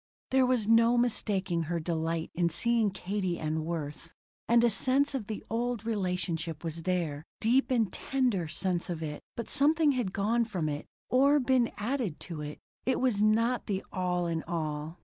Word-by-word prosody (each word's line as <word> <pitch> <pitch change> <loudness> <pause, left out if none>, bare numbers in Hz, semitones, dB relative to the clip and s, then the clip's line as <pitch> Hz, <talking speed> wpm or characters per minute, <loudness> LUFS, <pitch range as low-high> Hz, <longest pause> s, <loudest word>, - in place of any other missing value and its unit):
There 260 -1 +4
was 245 -5 +1
no 230 +1 +5
mistaking 195 -8 0
her 170 -1 0
delight 165 0 -2
in 170 0 +1
seeing 230 +5 +2
Katie 190 -2 -2
and 155 0 -2
Worth. 160 -1 -5 0.4
And 235 0 +5
a 240 - +5
sense 265 +8 +2
of 245 -7 -3
the 215 - -5
old 235 0 -2
relationship 180 -6 -2
was 165 0 -4
there 165 -5 -1 0.2
deep 245 +5 +3
and 225 -7 +1
tender 245 -11 0
sense 175 +3 -1
of 165 -2 -3
it; 150 -1 -5 0.2
but 235 - -4
something 300 +1 +4
had 245 -8 -1
gone 220 +5 +1
from 185 -8 -2
it, 145 0 -4 0.2
or 280 +3 +5
been 255 -2 +2
added 225 - -2
to 165 -4 -6
it. 150 0 -6 0.3
It 260 - +1
was 245 -6 +1
not 230 +3 +2
the 195 -3 -2
all 180 -1 0
in 165 -1 -1
all. 155 0 -3
195 Hz, 175 wpm, -30 LUFS, 165-240 Hz, 0.4 s, no